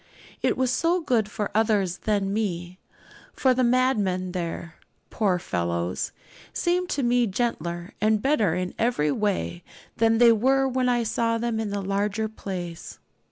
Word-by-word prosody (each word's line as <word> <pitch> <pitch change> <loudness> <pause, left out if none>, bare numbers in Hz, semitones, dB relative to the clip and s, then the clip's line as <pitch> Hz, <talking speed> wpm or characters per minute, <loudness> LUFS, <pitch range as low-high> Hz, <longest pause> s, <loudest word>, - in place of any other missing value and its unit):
It - - +1
was 260 -1 +1
so 335 +4 +1 0.2
for 210 0 -4
others 210 -5 +1
than 200 -2 0
me; 185 -4 -3 0.5
for 260 -1 +3
the 255 0 +1
madmen 215 -8 +1
there, 170 -2 -5 0.3
poor 195 -5 +1
fellows, 85 - -2 0.4
seemed 360 0 0
to 280 - -1
me 240 0 +3
gentler 175 -5 -2
and 215 0 +3
better 265 -3 +2
in 180 0 -3
every 225 -11 +1
way 190 -1 -1 0.3
than 225 0 +3
they 235 0 +7
were 265 +4 +3
when 255 -1 +1
I 240 -1 +2
saw 230 +1 0
them 230 -1 -1
in 220 -2 -2
the 200 0 -3
larger 205 +3 -1
place. 180 -6 -7
215 Hz, 150 wpm, -25 LUFS, 185-240 Hz, 0.5 s, they